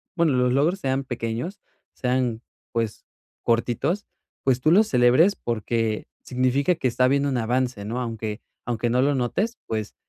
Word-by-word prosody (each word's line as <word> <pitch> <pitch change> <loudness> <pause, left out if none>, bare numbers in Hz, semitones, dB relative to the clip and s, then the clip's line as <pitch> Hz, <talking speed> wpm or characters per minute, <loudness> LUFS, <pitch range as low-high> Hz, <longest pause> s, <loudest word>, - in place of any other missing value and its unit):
bueno, 170 -4 +3
los 125 0 +2
logros 155 +9 +2
sean 135 -2 0
pequeños, 120 - -4 0.3
sean, 125 -2 0 0.3
pues, 115 -2 -2 0.4
cortitos, 120 - 0 0.4
pues 130 -2 +2
tú 155 - +2
los 210 +5 +6
celebres 130 +10 +5
porque 115 -1 -1 0.2
significa 130 +6 +1
que 140 -6 0
está 125 +1 +2
habiendo 140 +2 +2
un 130 - 0
avance, 120 -2 -1
¿no? 120 +4 -3
Aunque 110 -2 -4 0.2
aunque 120 -1 -1
no 125 +2 +2
lo 140 +1 +2
notes, 185 - -1
pues, 110 -2 -4
125 Hz, 155 wpm, -24 LUFS, 115-140 Hz, 0.4 s, los